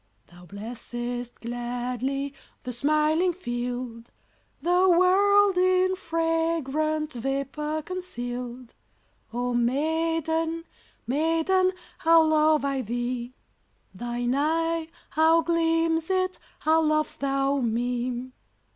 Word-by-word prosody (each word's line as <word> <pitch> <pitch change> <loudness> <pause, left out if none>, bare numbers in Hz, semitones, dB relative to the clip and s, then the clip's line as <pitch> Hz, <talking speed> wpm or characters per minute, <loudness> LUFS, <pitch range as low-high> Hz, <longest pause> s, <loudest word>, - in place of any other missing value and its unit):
Thou 175 0 -15
blessest 240 +3 -5
gladly 245 +3 -3 0.3
The 250 - -4
smiling 305 +7 +2
field, 240 -6 -5 0.5
The 360 +2 +4
world 385 +2 +5
in 370 0 +3
fragrant 325 -3 -1
Vapour 275 +5 -2
conceal'd. 250 -9 -5 0.6
Oh 245 +1 -2
maiden, 320 +5 0 0.4
maiden, 330 +8 +2 0.3
How 330 0 +6
love 310 -2 +3
I 275 -1 0
thee! 240 +1 -3 0.6
Thine 240 +3 -2
eye, 325 +3 0 0.2
how 320 +1 +4
gleams 330 0 +1
it! 370 -1 0 0.2
How 320 +1 +4
lov'st 310 -1 0
thou 275 0 +1
me! 245 +1 -2
300 Hz, 90 wpm, -26 LUFS, 245-330 Hz, 0.6 s, How